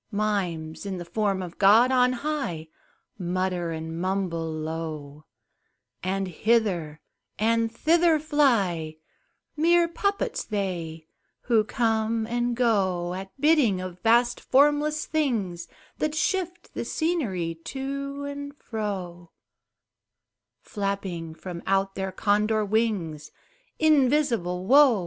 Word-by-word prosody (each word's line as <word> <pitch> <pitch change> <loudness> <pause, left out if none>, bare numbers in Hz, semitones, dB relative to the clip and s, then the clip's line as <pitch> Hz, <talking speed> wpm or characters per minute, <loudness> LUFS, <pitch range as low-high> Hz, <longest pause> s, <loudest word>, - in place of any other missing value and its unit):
Mimes, 190 -7 -2
in 195 -2 -4
the 175 - -6
form 195 0 -1
of 175 -2 -9
God 220 +6 +6
on 250 -1 +4
high, 250 - -3 0.5
Mutter 180 -1 -1
and 160 +1 -5
mumble 180 -4 -1
low, 155 -2 -5 0.8
And 190 +1 -1
hither 185 -5 0 0.4
and 230 +1 +1
thither 330 +6 +3
fly 230 - +1 0.6
Mere 340 +2 +4
puppets 400 +4 -1
they, 175 -6 -4 0.4
who 230 -3 +3
come 225 0 0
and 240 +1 -1
go 190 -7 +1
At 190 +6 -8
bidding 290 - +4
of 185 -1 -7
vast 240 +2 +3
formless 295 +2 +2
things 215 - -1 0.3
That 305 0 -1
shift 360 0 -2
the - - -3
scenery 195 - -1
to 275 +1 -4
and 285 0 -6
fro, 185 - -5 1.3
Flapping 195 -6 -4
from 175 0 -7
out 195 0 +1
their 190 -1 -3
Condor 210 +2 +1
wings 200 -8 -1 0.5
Invisible 260 - +2
Wo! 265 -2 +6
205 Hz, 110 wpm, -26 LUFS, 175-265 Hz, 1.3 s, God